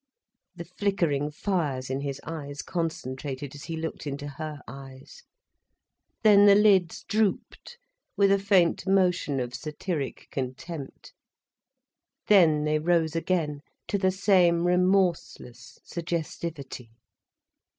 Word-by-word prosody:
The 170 - -7
flickering 170 -6 -1
fires 150 -6 -2
in 135 +1 -2
his 140 -1 -4
eyes 145 -3 -6
concentrated 140 -5 -4
as 145 - -10
he 165 -1 -5
looked 160 -1 -5
into 145 +1 -5
her 150 +1 -7
eyes. 135 - -11 1.0
Then 205 -1 +7
the 200 - +8
lids 195 -5 +3
drooped 215 - -2 0.4
with 200 -1 +4
a 200 - +4
faint 190 -3 +2
motion 180 -7 +2
of 125 -1 -4
satiric 150 +2 -5
contempt. 135 +3 -6 1.1
Then 165 -7 +5
they 155 0 +1
rose 165 -1 +1
again 165 -4 -1 0.3
to 200 - 0
the 190 -1 +3
same 185 -3 +3
remorseless 180 -9 0
suggestivity. 165 -6 -5
165 Hz, 110 wpm, -27 LUFS, 140-185 Hz, 1.1 s, the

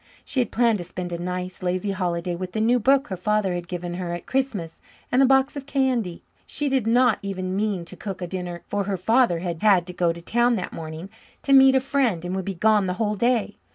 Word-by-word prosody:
She 265 - -2
had 240 - 0
planned 230 -3 +2
to - - -4
spend 180 0 -6
a 170 - -4
nice, 180 +1 -4
lazy 185 +2 -1
holiday 175 -2 -2
with 180 +1 -6
the 220 - -1
new 235 +3 +3
book 270 +4 +3
her 190 - -2
father 205 0 0
had 175 0 -4
given 175 0 -5
her 175 -1 -4
at 175 - -9
Christmas 230 -12 -2 0.3
and 255 - +4
a 270 - +6
box 270 +1 +3
of 280 -1 -7
candy. 255 -10 0 0.2
She 290 -1 -1
did 265 -5 0
not 245 +2 +4
even 185 -2 -3
mean 200 -4 -1
to 165 - -9
cook 195 -3 -6
a 180 - -3
dinner, 175 -1 -5
for 205 -1 -2
her 195 -1 -2
father 225 0 +3
had 170 -3 -4
had 195 -5 +4
to 180 - -8
go 175 -1 +1
to 170 - -7
town 240 +7 +2
that 185 - -4
morning 160 +4 -7 0.3
to 275 - +2
meet 270 0 +7
a - - +5
friend 255 -10 0
and 180 +1 -3
would 190 -1 -3
be 195 - -3
gone 210 +1 +3
the 180 - 0
whole 210 -2 0
day. 230 -1 0
195 Hz, 245 wpm, -24 LUFS, 180-240 Hz, 0.3 s, meet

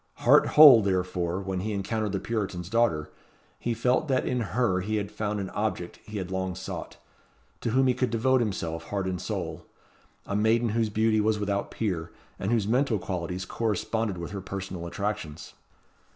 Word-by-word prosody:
Heart - - +5
whole, 145 -7 +11
therefore, 90 -2 -1
when 95 -1 -3
he 105 +3 -2
encountered 105 +1 -2
the 95 - -1
Puritan's 95 -6 -3
daughter, 95 -10 +1 0.5
he 120 -1 -1
felt 125 +6 +1
that 130 -2 +1
in 125 - 0
her 110 -2 +1
he 105 +4 -2
had 105 -1 -2
found 105 -1 -2
an 95 -1 -4
object 95 -4 -3
he 105 -1 -7
had 95 -2 -4
long 95 -1 -2
sought, 95 - -7 0.6
to - - -2
whom 130 +3 +3
he 130 - +4
could 125 0 0
devote 125 +3 +2
himself 85 -7 -3
heart 100 -2 -2
and 90 -2 -3
soul; 90 -4 -4 0.6
a 100 - -3
maiden 110 +3 +3
whose 110 0 +1
beauty 110 +1 +2
was 110 0 +2
without 100 -1 -1
peer, 90 -7 -3 0.3
and 95 - -1
whose 110 -4 +1
mental 125 0 +2
qualities 90 -1 -4
corresponded 110 -1 -1
with 85 0 -6
her 100 -1 -5
personal 95 -3 -5
attractions. 85 -5 -4
105 Hz, 180 wpm, -27 LUFS, 95-115 Hz, 0.6 s, whole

